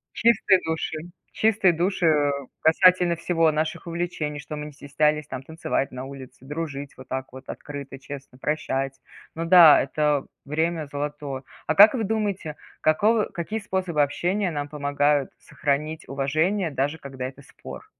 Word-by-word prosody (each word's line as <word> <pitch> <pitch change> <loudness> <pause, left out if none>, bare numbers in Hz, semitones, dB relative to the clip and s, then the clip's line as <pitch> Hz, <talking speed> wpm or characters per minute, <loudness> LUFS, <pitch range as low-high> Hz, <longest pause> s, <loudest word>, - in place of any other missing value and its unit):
Чистые 210 -4 +4
души 160 0 -2 0.4
чистые 215 -4 +3
души, 175 +2 0
э, 150 -3 +3 0.3
касательно 180 +1 +4
всего: 165 -1 +2
наших 155 +2 -2
увлечений, 165 -3 -3
что 150 +2 -7
мы 150 0 -6
не - - -9
стеснялись 150 +1 0
там 130 -2 -6
танцевать 160 -2 -2
на 130 +1 -6
улице, 130 -2 -11
дружить 145 -1 -5
вот 130 0 -13
так 130 -1 -4
вот 130 0 -12
открыто, 140 -2 -7
честно, 140 -1 -10
прощать. 135 -1 -2 0.4
Ну 165 - -3
да, 165 -2 +8
это 150 +1 0 0.2
время 160 +1 -1
золотое. 145 -1 -5 0.2
А 155 - +1
как 205 +2 +9
вы 230 -4 -1
думаете, 200 -7 -2 0.2
какого 210 +8 +3
какие 195 +6 -4
способы 185 -6 -1
общения 180 +7 0
нам 145 -3 -4
помогают 145 -1 +1
сохранить 155 +1 -3
уважение, 155 +7 0
даже 145 +3 -1
когда 130 -2 -6
это 135 +2 -11
спор? 140 - -11
150 Hz, 150 wpm, -24 LUFS, 140-175 Hz, 0.4 s, как